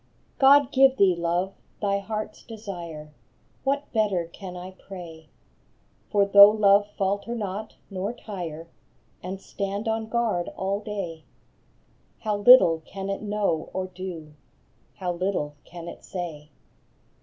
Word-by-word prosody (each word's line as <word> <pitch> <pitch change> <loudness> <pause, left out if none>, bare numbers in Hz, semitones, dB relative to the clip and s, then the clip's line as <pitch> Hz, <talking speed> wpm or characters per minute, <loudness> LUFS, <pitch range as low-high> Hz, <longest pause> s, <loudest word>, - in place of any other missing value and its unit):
fOD 280 0 +6
give 270 0 +5
thee, 190 -4 +5
love, 175 +3 -1 0.3
thy 200 -1 +1
heart 215 +2 -4
s - - -19
desire 175 -9 -8
I - - -29 0.5
What 280 +1 -1
better 205 -6 +1
can 180 -2 -8
I 180 +1 -8
pray? 170 -5 -11 0.8
For 200 -1 +3
though 200 0 +9
love 205 -1 +4
falter 200 +4 -1
not, 210 0 -5 0.2
nor 195 +2 -2
tire, 175 -8 -7 0.5
And 185 +2 -5
stand 200 +2 -4
on 220 0 -1
guard 225 -7 0
all 195 +1 -1
day, 195 -7 -5 1.0
How 210 -2 -1
little 205 -7 +7
can 195 +2 -5
it 195 - -4
know 205 -6 -1
or 185 0 -2
do, 175 -4 -7 0.6
How 180 -2 -2
little 175 -5 -2
can 170 -1 -10
it - - -9
say 160 -5 -6
195 Hz, 135 wpm, -26 LUFS, 175-210 Hz, 1.0 s, though